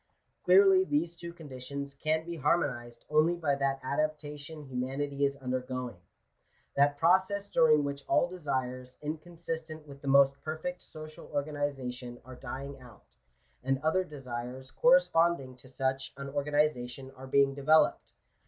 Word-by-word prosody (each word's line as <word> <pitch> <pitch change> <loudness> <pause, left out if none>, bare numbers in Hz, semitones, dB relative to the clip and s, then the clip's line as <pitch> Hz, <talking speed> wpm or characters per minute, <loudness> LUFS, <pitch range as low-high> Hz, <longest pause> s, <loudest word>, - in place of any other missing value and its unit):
Clearly 390 -1 +7
these 290 - 0
two 170 0 -8
conditions 140 -3 -7
can 155 +3 -1
be 170 0 -5
harmonized 130 -6 -1
only 155 +3 +3
by 160 -4 0
that 135 -1 0
adaptation 150 +1 -3
humanity 135 +2 -2
is 140 0 0
undergoing 130 -4 -4 0.4
— - - -40
that 145 +1 +3
process 190 +5 +3
during 155 -5 +4
which 140 0 -4
all - - +3
desires 130 -7 -4
inconsistent 160 0 -5
with 140 -1 -12
the 140 - -8
most 135 0 +5
perfect 160 +3 -4
social 155 0 -11
organiza 145 -3 -2
tion 120 -1 -9
are 130 - -10
dying 135 +2 -7
out, 120 -5 -15 0.6
and 135 0 +1
other 160 +4 +2
desires 130 -4 -7
corresponding 170 - +3
to 130 +1 -16
such 135 0 -2
an 140 0 -6
organization 140 -3 -1
are 130 0 -10
being 135 +1 +4
developed. 150 +3 +3
140 Hz, 140 wpm, -30 LUFS, 130-160 Hz, 0.6 s, Clearly